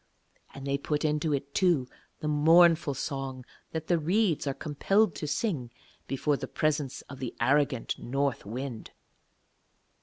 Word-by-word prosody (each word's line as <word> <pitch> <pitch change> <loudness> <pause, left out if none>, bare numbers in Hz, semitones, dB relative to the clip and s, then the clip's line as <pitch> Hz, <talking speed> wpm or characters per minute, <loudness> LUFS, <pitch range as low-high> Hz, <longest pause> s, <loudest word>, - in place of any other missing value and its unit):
And 135 0 -8
they 140 0 0
put 150 +2 -1
into 150 +1 +1
it, 140 0 -2
too, 170 -9 +3 0.3
the 150 - -2
mournful 160 0 +5
song 135 -2 -4 0.2
that 160 -1 -4
the 175 -1 +2
reeds 175 -1 +1
are 140 - +1
compelled 190 +6 +1
to 150 - -4
sing 150 - -1 0.4
before 140 +2 0
the - - -5
presence 150 -3 -1
of 140 - -11
the 125 -3 -5
arrogant 140 -3 +1
North 135 0 -1
Wind. 120 +2 -6
145 Hz, 145 wpm, -29 LUFS, 135-160 Hz, 0.4 s, mournful